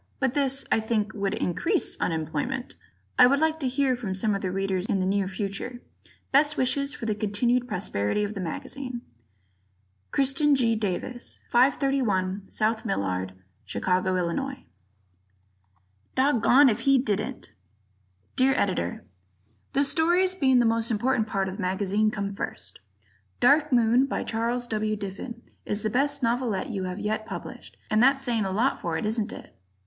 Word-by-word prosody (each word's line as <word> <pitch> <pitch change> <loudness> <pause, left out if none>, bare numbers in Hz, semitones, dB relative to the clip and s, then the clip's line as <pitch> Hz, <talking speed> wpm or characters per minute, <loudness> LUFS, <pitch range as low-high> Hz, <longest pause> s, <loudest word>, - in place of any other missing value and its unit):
[But 260 -2 +1
this, 275 -1 +1
I - - +4
think, 220 -1 -1
would 200 -2 -1
increase 335 - 0
unemployment! 165 - -2 0.5
Ed.]. - - +10
I - - +9
would 280 +2 +3
like 320 0 +1
to 270 - -1
hear 265 0 +1
from 210 -6 -4
some 210 +2 +1
of 195 - -2
the 185 - -2
Readers 190 0 -1
in - - +1
the 185 - 0
near 195 0 +1
future. 200 +5 -4 0.5
Best 295 +3 +4
wishes 280 +2 +1
for 280 - -4
the 215 - +1
continued 235 +4 0
prosperity 180 - -1
of 205 +1 -3
the 200 - -6
magazine. 245 - -5 1.1
Christen 280 +2 +3
G. 230 -4 +2
Davis, 220 +4 -3
531 240 -7 +1
South 220 +1 0
Millard, 95 -1 -2 0.3
Chicago, 185 0 0
Ill. 185 +11 -2 1.6
Doggoned 265 0 +5
If 215 - -2
He 275 +3 +4
Didn't! 240 +1 -2 0.8
Dear 265 +1 +4
Editor: 90 - -1 0.7
The 280 - +3
stories, 350 +5 +3
being 270 -8 +3
the 240 - +4
most 225 0 +1
important 225 0 +1
part 195 -2 -1
of 190 +1 -5
the - - -5
magazine, 200 +3 +1
come 200 -2 -3
first: 95 - -5 0.6
"Dark 300 +1 +4
Moon," 240 +2 +4
by - - -2
Charles 235 +2 -1
W. 215 -2 -1
Diffin, 210 +4 -7 0.2
is 205 +1 -3
the 215 - 0
best 280 +2 0
novelette 235 0 0
you 195 -4 -3
have 180 0 -4
yet 215 +1 -2
published, - - -8
and 215 +1 +4
that's 270 +2 +4
saying 230 -5 0
a 190 - -2
lot 230 +8 +1
for 165 -2 -2
it, - - -3
isn't 220 0 -1
it? - - -11
225 Hz, 160 wpm, -26 LUFS, 195-265 Hz, 1.6 s, Ed